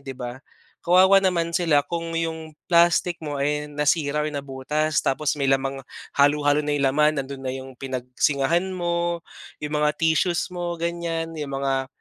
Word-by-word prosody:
'di 135 -2 -8
ba? 125 0 -6 0.4
Kawawa 185 +3 +6
naman 170 -3 +1
sila 165 -5 +3
kung 165 -1 -4
'yong 160 -2 -4
plastic 170 0 +3
mo, 145 -2 -4
eh, 150 +1 -1
nasira 150 0 +1
or 155 - -2
nabutas, 140 +2 -2
tapos 145 +2 0
may 140 - 0
lamang, 135 0 +1 0.4
halu-halo 145 +1 +3
na 150 - -1
yung 140 -1 +1
laman, 150 +1 +2
nandoon 135 0 -8
na 130 - -2
'yong 130 0 -7
pinagsingahan 135 +7 0
mo, 170 -1 -1 0.4
'yong 150 0 -3
mga 150 0 +3
tissues 165 +3 +1
mo, 175 -1 -3
ganyan, 170 -1 -2
'yong 145 -2 -5
mga, 135 -1 -1
150 Hz, 160 wpm, -24 LUFS, 140-170 Hz, 0.4 s, Kawawa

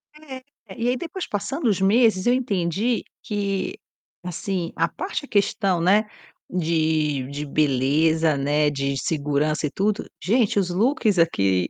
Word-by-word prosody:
É. 275 -4 -10 0.3
E 235 +1 0
aí 255 - +1
depois 345 +5 -5
passando 250 +6 -2
os 200 -4 +2
meses 205 -1 +3
eu 245 - +5
entendi 220 -2 0 0.2
que 200 -2 -2 0.5
assim, 180 0 -3
a - - +2
parte 325 -5 -5
questão, 195 -3 +1
né, 200 +6 +3 0.4
de 155 -5 0
de 145 +1 -4
beleza, 150 +3 +2
né, 145 +2 +2
de 140 -1 -2
segurança 150 0 0
e - - -7
tudo, 205 +2 -1 0.2
gente 215 -1 +2
os 185 - 0
looks 215 - +1
aqui 95 - +2
180 Hz, 140 wpm, -23 LUFS, 150-220 Hz, 0.5 s, eu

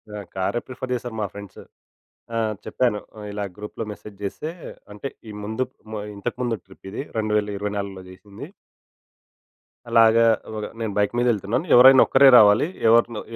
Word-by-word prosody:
ఆహ్, 105 -1 -7
కారే 95 +5 -1
ప్రిఫర్ 130 0 -7
చేశారు 120 -1 -6
మా - - 0
ఫ్రెండ్స్. 100 -1 -10 0.7
ఆహ్, 110 -1 0
చెప్పాను 120 -5 0 0.3
ఇలా 100 0 -4
గ్రూప్‌లో 105 +2 -6
మెసేజ్ 105 -1 -11
జేస్తే 100 +10 -4 0.4
అంటే, 105 +7 -6 0.2
ఈ - - -7
ముందు 110 +4 -2 0.5
ఇంతకుముందు 120 +2 -3
ట్రిప్ 95 0 -15
ఇది. 110 - -4
2024 105 -2 -2
జేసింది. 100 +2 -11 1.4
అలాగా, 115 0 +5 0.3
ఒగ 105 - -4 0.2
నేను 110 -2 -2
బైక్ 105 +2 +1
మీద 120 - +2
యెళ్తున్నాను 110 - -1
ఎవరైనా 130 +1 +8
ఒక్కరే 135 +1 +6
రావాలి. 105 +7 +5 0.2
ఎవరినో 115 -1 +3
105 Hz, 135 wpm, -23 LUFS, 100-120 Hz, 1.4 s, ఎవరైనా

